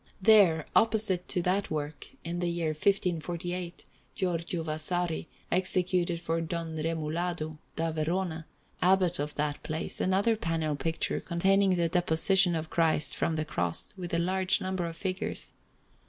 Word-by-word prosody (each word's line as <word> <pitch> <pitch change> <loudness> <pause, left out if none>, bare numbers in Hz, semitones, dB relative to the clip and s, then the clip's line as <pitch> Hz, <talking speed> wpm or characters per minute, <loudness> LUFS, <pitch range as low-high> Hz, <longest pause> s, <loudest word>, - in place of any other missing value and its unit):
There, 190 -7 +5
opposite 215 -5 +2
to 180 - -1
that 190 +3 0
work, 150 -1 -4 0.2
in 170 +1 -3
the 175 -1 0
year 170 -2 -1
1548, 175 +1 -1 0.3
Giorgio 170 -2 -2
Vasari 160 +2 -2 0.2
executed 180 -1 +1
for 165 -1 -1
Don 165 0 -4
Romualdo 160 0 -2 0.2
da 165 0 -1
Verona, 160 +1 -2 0.3
Abbot 180 -1 +3
of 150 +1 -3
that 150 0 -2
place, 155 +1 -4
another 195 +5 +2
panel 165 -6 -1
picture 165 +3 -1
containing 195 +2 +2
the 170 -1 +1
Deposition 175 +2 +4
of 160 0 -4
Christ 160 -2 +2
from 165 - 0
the 155 0 -1
Cross, 85 - -2
with 180 -2 -6
a 170 - +1
large 185 +2 +2
number 185 -2 -2
of 165 0 -7
figures. 185 +2 -1
170 Hz, 140 wpm, -29 LUFS, 160-185 Hz, 0.3 s, There